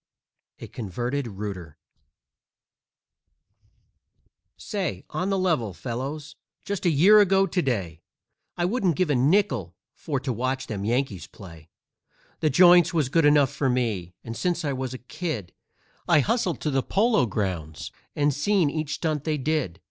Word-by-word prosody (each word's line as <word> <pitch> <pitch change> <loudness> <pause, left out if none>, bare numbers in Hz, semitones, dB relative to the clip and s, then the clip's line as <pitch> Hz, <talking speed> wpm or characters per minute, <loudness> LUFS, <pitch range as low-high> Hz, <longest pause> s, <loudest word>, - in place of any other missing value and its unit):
_ - - -10
A - - -6
CONVERTED 120 +5 -4
ROOTER 95 -7 -7 2.8
Say, 180 - -4
on 185 - -2
the 195 - +1
level, 155 - 0
fellows, 140 - -5 0.3
just 200 -3 -2
a - - +5
year 180 +8 +6
ago 195 -1 +4
to 190 -1 -1
day 95 - -2 0.6
I 175 - +1
wouldn't 185 - +1
give 180 -5 +1
a - - +2
nickel 130 - +1 0.2
for 145 -4 -3
to 130 -2 -2
watch 130 +3 -2
them 100 -2 -5
Yankees 120 -5 -1
play; 80 -5 -13 0.7
The 155 - +2
Joints 175 +3 +6
was 150 -6 +1
good 165 +2 +3
enough 145 -3 +5
for 135 - -1
me, 110 -8 -1
and 115 0 -6
since 175 +3 -1
I 140 - 0
was 130 -1 -4
a 125 - -12
kid 125 - -5 0.5
I 170 -4 +5
hustled 180 - -1
to 150 - -1
the 135 -1 +1
Polo 215 - +2
Grounds 90 -7 -4 0.2
and 145 0 +2
seen 165 +2 +1
each 155 -1 -3
stunt 155 -4 -2
they 155 -1 -1
did. 140 - -2
140 Hz, 155 wpm, -25 LUFS, 115-170 Hz, 2.8 s, year